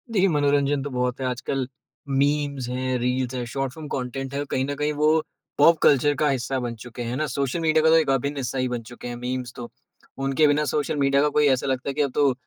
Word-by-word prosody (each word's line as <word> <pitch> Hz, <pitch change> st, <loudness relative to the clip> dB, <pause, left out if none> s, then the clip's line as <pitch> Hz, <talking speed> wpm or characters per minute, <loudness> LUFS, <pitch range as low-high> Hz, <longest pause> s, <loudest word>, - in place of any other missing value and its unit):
देखिए 195 Hz, -3 st, +3 dB
मनोरंजन 145 Hz, -2 st, +2 dB
तो 145 Hz, -, -4 dB
बहुत 125 Hz, -1 st, -1 dB
है -, -, -1 dB
आजकल, 125 Hz, +1 st, -2 dB, 0.4 s
मीम्स 140 Hz, -1 st, 0 dB
हैं, 130 Hz, 0 st, -1 dB
रील्स 125 Hz, +1 st, -1 dB
है, 125 Hz, -1 st, -3 dB
शॉर्ट 135 Hz, +2 st, -3 dB
फिल्म 155 Hz, 0 st, -8 dB
कंटेंट 135 Hz, 0 st, -4 dB
है 140 Hz, +1 st, -1 dB
कहीं 130 Hz, -, +1 dB
न 145 Hz, +1 st, -3 dB
कहीं 150 Hz, +1 st, -1 dB
वो 155 Hz, +2 st, +3 dB, 0.4 s
पॉप 165 Hz, +3 st, +6 dB
कल्चर 145 Hz, +1 st, +5 dB
का 150 Hz, -, +3 dB
हिस्सा 130 Hz, 0 st, -1 dB
बन 120 Hz, -2 st, -4 dB
चुके 120 Hz, +2 st, -9 dB
हैं, 115 Hz, -, -3 dB
है 120 Hz, -, -3 dB
ना? 155 Hz, +3 st, 0 dB
सोशल 140 Hz, +3 st, -2 dB
मीडिया 160 Hz, -1 st, +2 dB
का 160 Hz, -, +5 dB
तो 160 Hz, -, +6 dB
एक 160 Hz, -3 st, +2 dB
अभिन्न 140 Hz, +2 st, 0 dB
हिस्सा 135 Hz, 0 st, -3 dB
ही 130 Hz, 0 st, +1 dB
बन 120 Hz, -1 st, -3 dB
चुके 120 Hz, -, -8 dB
हैं 120 Hz, -, -5 dB
मीम्स 125 Hz, 0 st, -4 dB
तो। 120 Hz, -1 st, -7 dB, 0.5 s
उनके 135 Hz, +3 st, +2 dB
बिना 145 Hz, +1 st, +2 dB
सोशल 145 Hz, +2 st, -1 dB
मीडिया 140 Hz, 0 st, +3 dB
का 150 Hz, -, +3 dB
कोई 150 Hz, 0 st, +3 dB
ऐसा 130 Hz, 0 st, +2 dB
लगता 130 Hz, +1 st, -1 dB
है -, -, -2 dB
कि -, -, -1 dB
अब 140 Hz, -2 st, +1 dB
तो 140 Hz, -3 st, +3 dB
135 Hz, 250 wpm, -24 LUFS, 125-145 Hz, 0.5 s, पॉप